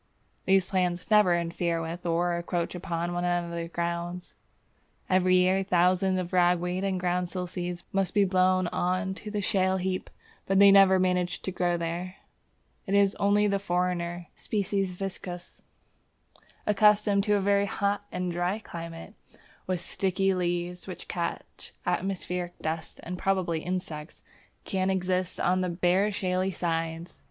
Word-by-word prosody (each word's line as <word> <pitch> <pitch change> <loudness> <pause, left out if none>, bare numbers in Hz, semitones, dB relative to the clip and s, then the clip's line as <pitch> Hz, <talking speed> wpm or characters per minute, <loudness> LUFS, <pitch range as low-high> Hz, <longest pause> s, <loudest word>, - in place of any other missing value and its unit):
These 190 -1 +4
plants 180 0 -1
never 205 -5 +5
interfere 170 0 -1
with 165 +2 -5
or 170 +1 +1
encroach 170 0 -2
upon 175 -1 -3
one 175 0 -2
another's 170 -1 -1
grounds. 170 +1 -4 0.8
Every 185 0 +4
year 185 +1 +3
thousands 185 +1 +2
of 180 -1 -4
ragweed 180 +1 +2
and 190 -2 0
groundsel 180 0 -1
seeds 175 -1 -5
must 195 0 +1
be 205 -1 +5
blown 185 0 +3
on 185 +3 -1
to 210 +2 -8
the 210 -1 -2
shale 190 -2 +2
heap, 185 0 -2 0.4
but 195 - +2
they 200 0 +8
never 195 -1 +7
manage 180 -1 0
to 190 - -3
grow 175 -1 0
there. 170 +2 -4 0.7
It 195 - +1
is 200 -1 +4
only 205 +1 +3
the 200 -1 +1
foreigner 175 -2 -1
(S. - - -10
viscosus), 195 -3 -3 1.0
accustomed 210 -1 +4
to 210 -1 +3
a - - +2
very 200 +1 +2
hot 200 +1 -1
and 180 -1 -2
dry 175 +3 -1
climate, 165 -2 -8 0.2
and - - -23 0.3
with 185 -2 -1
sticky 195 +1 0
leaves 175 0 -2
which 185 - -8
catch 170 -1 -5
atmospheric 180 -1 -2
dust 160 +1 -4
and 180 +1 -5
probably 185 -4 0
insects, 165 -3 -5 0.4
that - - -18
can 190 -1 0
exist 185 -1 -1
on 185 +1 +2
the 180 - 0
bare 180 +4 +2
shaly 185 -1 0
sides. 165 -1 -3
180 Hz, 150 wpm, -28 LUFS, 175-190 Hz, 1.0 s, they